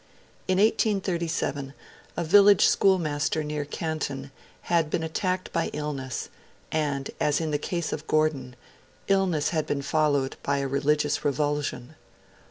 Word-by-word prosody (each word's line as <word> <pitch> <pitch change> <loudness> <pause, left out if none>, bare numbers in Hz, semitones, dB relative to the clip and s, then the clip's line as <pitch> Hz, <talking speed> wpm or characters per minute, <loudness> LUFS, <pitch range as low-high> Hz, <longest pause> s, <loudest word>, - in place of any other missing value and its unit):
In 185 - +2
1837, 175 -9 0 0.4
a 170 - 0
village 200 +4 +6
schoolmaster 155 -5 +2
near 150 -1 -3
Canton 140 -3 -4 0.3
had 165 -3 +1
been 160 - -1
attacked 185 +3 -2
by - - +1
illness; 145 -3 -4 0.4
and, 145 -3 -1
as 150 -1 +2
in 160 -2 -2
the 145 - 0
case 170 +1 -3
of 155 +1 -6
Gordon, 145 -5 0 0.5
illness 180 -7 +2
had 155 -3 -1
been 140 -1 -2
followed 145 -2 +1
by 140 0 0
a 140 0 -1
religious 150 +2 +1
revulsion. 145 -2 -1
150 Hz, 130 wpm, -26 LUFS, 145-170 Hz, 0.5 s, village